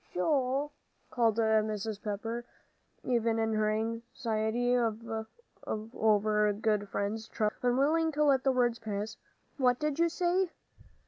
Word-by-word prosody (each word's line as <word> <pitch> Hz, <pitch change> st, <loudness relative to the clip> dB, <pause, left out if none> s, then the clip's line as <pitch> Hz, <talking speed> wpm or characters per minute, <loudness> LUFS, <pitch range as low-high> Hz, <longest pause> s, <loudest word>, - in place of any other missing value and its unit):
"Joel," 270 Hz, -, +1 dB, 0.4 s
called 230 Hz, -3 st, +2 dB
Mrs. 215 Hz, -1 st, +1 dB
Pepper, 225 Hz, +3 st, -3 dB, 0.6 s
even 230 Hz, -2 st, +1 dB
in 225 Hz, 0 st, 0 dB
her 215 Hz, 0 st, +2 dB
anxiety 230 Hz, +1 st, -1 dB
over 220 Hz, -, -1 dB
good 210 Hz, -1 st, 0 dB
friends' 210 Hz, +3 st, -2 dB
trouble, 210 Hz, -2 st, -1 dB
unwilling 285 Hz, +7 st, +2 dB
to 300 Hz, +1 st, +2 dB
let 275 Hz, -3 st, +4 dB
the 270 Hz, -, +3 dB
word 240 Hz, -2 st, +1 dB
pass, 210 Hz, 0 st, -4 dB, 0.4 s
"what 250 Hz, -3 st, +3 dB
did 300 Hz, +2 st, -2 dB
you 335 Hz, 0 st, +4 dB
say?" 355 Hz, +2 st, +1 dB
225 Hz, 120 wpm, -31 LUFS, 215-255 Hz, 0.6 s, let